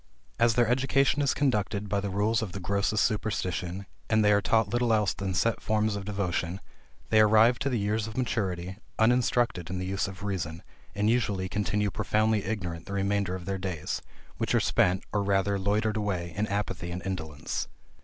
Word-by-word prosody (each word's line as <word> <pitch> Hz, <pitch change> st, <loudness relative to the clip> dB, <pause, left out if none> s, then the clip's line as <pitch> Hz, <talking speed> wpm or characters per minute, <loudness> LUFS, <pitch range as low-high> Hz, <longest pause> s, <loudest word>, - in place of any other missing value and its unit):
As 115 Hz, -1 st, +4 dB
their 120 Hz, -2 st, +4 dB
education 135 Hz, +3 st, +2 dB
is 140 Hz, -, +2 dB
conducted 105 Hz, -6 st, 0 dB
by 100 Hz, 0 st, 0 dB
the 100 Hz, 0 st, -3 dB
rules 105 Hz, +4 st, +1 dB
of 100 Hz, -5 st, -4 dB
the 100 Hz, -, -4 dB
grossest 100 Hz, +3 st, +1 dB
superstition, 95 Hz, -3 st, -2 dB, 0.2 s
and 110 Hz, -1 st, +3 dB
they 105 Hz, -, +5 dB
are 105 Hz, 0 st, +4 dB
taught 110 Hz, +1 st, +2 dB
little 120 Hz, +2 st, +1 dB
else 105 Hz, -3 st, +2 dB
than 95 Hz, -2 st, -3 dB
set 115 Hz, +3 st, +1 dB
forms 110 Hz, -1 st, +1 dB
of 100 Hz, -1 st, -5 dB
devotion, 95 Hz, -3 st, -2 dB, 0.5 s
they 110 Hz, -, +6 dB
arrive 110 Hz, +3 st, +5 dB
to 140 Hz, -, 0 dB
the 125 Hz, -, 0 dB
years 105 Hz, +1 st, 0 dB
of 110 Hz, +2 st, -8 dB
maturity 95 Hz, -7 st, -2 dB, 0.2 s
uninstructed 120 Hz, -5 st, +2 dB
in 95 Hz, -, -3 dB
the 90 Hz, -, -3 dB
use 95 Hz, +2 st, -1 dB
of 95 Hz, -1 st, -9 dB
reason, 85 Hz, -5 st, -3 dB, 0.3 s
and 105 Hz, +2 st, +2 dB
usually 105 Hz, -6 st, 0 dB
continue 105 Hz, +1 st, 0 dB
profoundly 110 Hz, 0 st, +1 dB
ignorant 90 Hz, -7 st, -4 dB
the 100 Hz, -, -5 dB
remainder 100 Hz, -1 st, 0 dB
of 90 Hz, -2 st, -7 dB
their 95 Hz, -1 st, -2 dB
days, 90 Hz, -5 st, -3 dB, 0.4 s
which -, -, 0 dB
are -, -, +5 dB
spent, 90 Hz, +1 st, +2 dB
or 105 Hz, -, +2 dB
rather 100 Hz, 0 st, +1 dB
loitered 105 Hz, +3 st, +1 dB
away, 90 Hz, -5 st, -2 dB
in 105 Hz, +2 st, 0 dB
apathy 100 Hz, -3 st, -3 dB
and 90 Hz, +1 st, -5 dB
indolence. 80 Hz, -6 st, -4 dB
100 Hz, 190 wpm, -28 LUFS, 95-110 Hz, 0.5 s, they